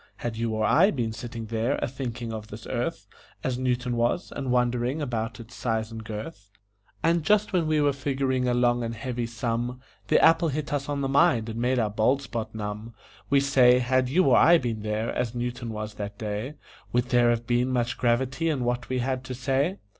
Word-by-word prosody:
Had 120 Hz, -2 st, -4 dB
you 115 Hz, 0 st, -1 dB
or 110 Hz, 0 st, +1 dB
I 190 Hz, +5 st, +5 dB
been 120 Hz, -, -2 dB
sitting 115 Hz, 0 st, -6 dB
there 115 Hz, +4 st, 0 dB
a -, -, -2 dB
thinking 120 Hz, -3 st, -5 dB
of 110 Hz, -1 st, -6 dB
this 110 Hz, 0 st, -10 dB
earth, 130 Hz, +7 st, -3 dB, 0.4 s
As 125 Hz, -1 st, -1 dB
Newton 125 Hz, -1 st, 0 dB
was, 120 Hz, +9 st, 0 dB
and 135 Hz, -2 st, -3 dB
wondering 125 Hz, +2 st, +1 dB
about 120 Hz, -4 st, -3 dB
its 115 Hz, 0 st, -11 dB
size 110 Hz, -2 st, -2 dB
and 110 Hz, 0 st, -7 dB
girth, 105 Hz, 0 st, -7 dB, 0.5 s
And 170 Hz, +1 st, +3 dB
just 210 Hz, +5 st, +2 dB
when 170 Hz, -4 st, +2 dB
we 155 Hz, -1 st, +2 dB
were 145 Hz, -1 st, +3 dB
figuring 135 Hz, -2 st, -1 dB
a 120 Hz, -, +2 dB
long 120 Hz, 0 st, +2 dB
and 115 Hz, 0 st, -3 dB
heavy 120 Hz, -2 st, -3 dB
sum, 120 Hz, +1 st, -3 dB, 0.3 s
The -, -, +4 dB
apple 165 Hz, +1 st, +5 dB
hit 150 Hz, 0 st, -3 dB
us 145 Hz, 0 st, -2 dB
on 145 Hz, -1 st, -1 dB
the 135 Hz, -, 0 dB
mind 125 Hz, -5 st, +3 dB
and 110 Hz, +1 st, -5 dB
made 125 Hz, +1 st, +1 dB
our 110 Hz, -3 st, +1 dB
bald 125 Hz, +6 st, +2 dB
spot 110 Hz, -4 st, -5 dB
numb! 105 Hz, +1 st, -5 dB, 0.3 s
We 140 Hz, 0 st, +4 dB
say, 130 Hz, -3 st, +5 dB
had 125 Hz, 0 st, +1 dB
you 180 Hz, +8 st, +3 dB
or 130 Hz, -, +5 dB
I 170 Hz, +2 st, +7 dB
been 115 Hz, -7 st, -3 dB
there, 105 Hz, +1 st, -2 dB
as 120 Hz, -1 st, -2 dB
Newton 120 Hz, 0 st, -3 dB
was 105 Hz, -1 st, -5 dB
that 105 Hz, 0 st, -6 dB
day, 110 Hz, +7 st, -4 dB, 0.4 s
Would 125 Hz, +1 st, 0 dB
there 120 Hz, -1 st, +4 dB
have 120 Hz, 0 st, 0 dB
been 120 Hz, +1 st, +1 dB
much 125 Hz, 0 st, -1 dB
gravity 130 Hz, +6 st, +1 dB
in 140 Hz, -5 st, -1 dB
what 120 Hz, 0 st, -2 dB
we 130 Hz, -, 0 dB
had 130 Hz, +1 st, -1 dB
to 130 Hz, -1 st, -5 dB
say? 135 Hz, +8 st, 0 dB
125 Hz, 215 wpm, -26 LUFS, 115-135 Hz, 0.5 s, I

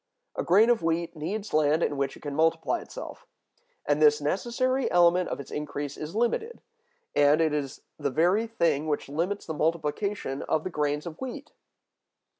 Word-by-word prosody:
A -, -, -1 dB
grain 210 Hz, +7 st, +5 dB
of 235 Hz, -, +2 dB
wheat 165 Hz, +1 st, -1 dB
needs 200 Hz, +8 st, -4 dB
land 155 Hz, +1 st, +3 dB
in 145 Hz, -, 0 dB
which 140 Hz, -1 st, -2 dB
it -, -, -17 dB
can 145 Hz, -1 st, -5 dB
multiply 165 Hz, -, +1 dB
itself, -, -, -9 dB, 0.6 s
and -, -, +1 dB
this 450 Hz, 0 st, +6 dB
necessary 255 Hz, +2 st, 0 dB
element 175 Hz, +1 st, +4 dB
of -, -, -4 dB
its 140 Hz, -, -9 dB
increase 145 Hz, -1 st, -4 dB
is 155 Hz, +5 st, -7 dB
limited; 445 Hz, -, -1 dB, 0.6 s
and 145 Hz, +2 st, +5 dB
it 160 Hz, -2 st, +2 dB
is 140 Hz, -3 st, -3 dB, 0.2 s
the -, -, 0 dB
very 180 Hz, -, +2 dB
thing 170 Hz, -9 st, 0 dB
which 145 Hz, -2 st, -2 dB
limits 175 Hz, +8 st, -2 dB
the 160 Hz, -, -4 dB
multiplication 160 Hz, 0 st, -1 dB
of 155 Hz, -, +1 dB
the 185 Hz, -, -4 dB
grains 150 Hz, 0 st, -1 dB
of 165 Hz, -2 st, -8 dB
wheat. 275 Hz, +3 st, -6 dB
165 Hz, 175 wpm, -27 LUFS, 150-215 Hz, 0.6 s, this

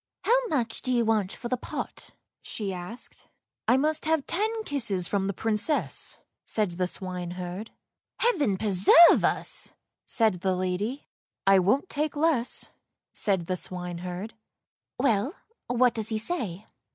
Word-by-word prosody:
" -, -, -62 dB
How -, -, +3 dB
much 245 Hz, -, -1 dB
do 255 Hz, -, -2 dB
you 240 Hz, -2 st, +2 dB
want 215 Hz, -4 st, +1 dB
for 240 Hz, -, -6 dB
the 255 Hz, +1 st, 0 dB
pot," -, -, -6 dB, 0.3 s
she 200 Hz, -3 st, -4 dB
asked. 180 Hz, +7 st, -6 dB, 0.2 s
" -, -, -65 dB
I 250 Hz, -, +5 dB
must 305 Hz, +3 st, +1 dB
have 315 Hz, -2 st, +1 dB
ten 440 Hz, +5 st, -1 dB
kisses 215 Hz, -, -1 dB
from 195 Hz, -1 st, 0 dB
the -, -, 0 dB
Princess," 225 Hz, -, 0 dB, 0.3 s
said 210 Hz, -4 st, 0 dB
the 180 Hz, +1 st, -1 dB
swine 180 Hz, -1 st, -5 dB
herd. 180 Hz, +4 st, -5 dB, 0.3 s
" -, -, -51 dB
Heaven 300 Hz, -, +2 dB
preserve 205 Hz, -, +7 dB
us! -, -, +1 dB
" -, -, -61 dB
said 215 Hz, -7 st, +2 dB
the 190 Hz, -1 st, +1 dB
lady. 185 Hz, +9 st, -2 dB, 0.2 s
" -, -, -66 dB
I 195 Hz, 0 st, +6 dB
won't 210 Hz, -, +2 dB
take 300 Hz, -1 st, -2 dB
less," 290 Hz, -5 st, +1 dB, 0.4 s
said 190 Hz, -5 st, 0 dB
the 185 Hz, -, -1 dB
swineherd. 180 Hz, +3 st, -5 dB, 0.4 s
" -, -, -61 dB
Well, 245 Hz, -, +1 dB, 0.3 s
what 245 Hz, 0 st, +3 dB
does 220 Hz, -2 st, -2 dB
he 220 Hz, -, 0 dB
say? 215 Hz, -, -2 dB
220 Hz, 165 wpm, -27 LUFS, 185-280 Hz, 0.4 s, preserve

